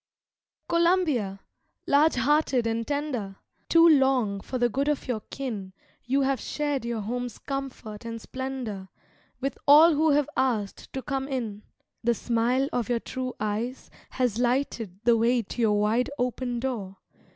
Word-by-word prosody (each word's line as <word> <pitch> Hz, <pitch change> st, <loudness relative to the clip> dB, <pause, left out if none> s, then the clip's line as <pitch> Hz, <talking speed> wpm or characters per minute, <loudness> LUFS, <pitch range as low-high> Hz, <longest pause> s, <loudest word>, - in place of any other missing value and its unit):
Columbia, 335 Hz, -, +1 dB, 0.4 s
large 295 Hz, +3 st, +4 dB
hearted 260 Hz, -1 st, +2 dB
and 230 Hz, 0 st, -1 dB
tender, 280 Hz, -9 st, -2 dB, 0.3 s
Too 335 Hz, 0 st, +7 dB
long 265 Hz, -9 st, +3 dB
for 255 Hz, -, -4 dB
the 240 Hz, -1 st, +3 dB
good 275 Hz, +5 st, -1 dB
of 295 Hz, -2 st, -1 dB
your 245 Hz, -4 st, -1 dB
kin 215 Hz, -9 st, -5 dB, 0.3 s
You 270 Hz, +3 st, +2 dB
have 270 Hz, -1 st, +1 dB
shared 290 Hz, -4 st, -2 dB
your 235 Hz, -2 st, -2 dB
home's 245 Hz, +2 st, -4 dB
comfort 265 Hz, -6 st, -6 dB
and 230 Hz, 0 st, -5 dB
splendor 250 Hz, -7 st, -5 dB, 0.5 s
With 275 Hz, +1 st, -3 dB
all 310 Hz, +4 st, +8 dB
who 310 Hz, +2 st, +3 dB
have 290 Hz, -1 st, +3 dB
asked 225 Hz, -7 st, -1 dB
to 265 Hz, -, -4 dB
come 270 Hz, -2 st, -2 dB
in. 230 Hz, -7 st, -3 dB, 0.4 s
The 235 Hz, 0 st, +2 dB
smile 240 Hz, +4 st, +1 dB
of 245 Hz, -2 st, -1 dB
your 240 Hz, -1 st, +1 dB
true 255 Hz, +1 st, -5 dB
eyes 215 Hz, +5 st, -3 dB, 0.2 s
has 245 Hz, -4 st, -1 dB
lighted 240 Hz, -6 st, -1 dB
The 235 Hz, 0 st, +5 dB
way 235 Hz, +1 st, +2 dB
to 235 Hz, -, -5 dB
your 210 Hz, -2 st, +3 dB
wide 220 Hz, +4 st, +1 dB
open 245 Hz, -1 st, -2 dB
door. 210 Hz, -8 st, -4 dB
250 Hz, 150 wpm, -27 LUFS, 225-275 Hz, 0.5 s, all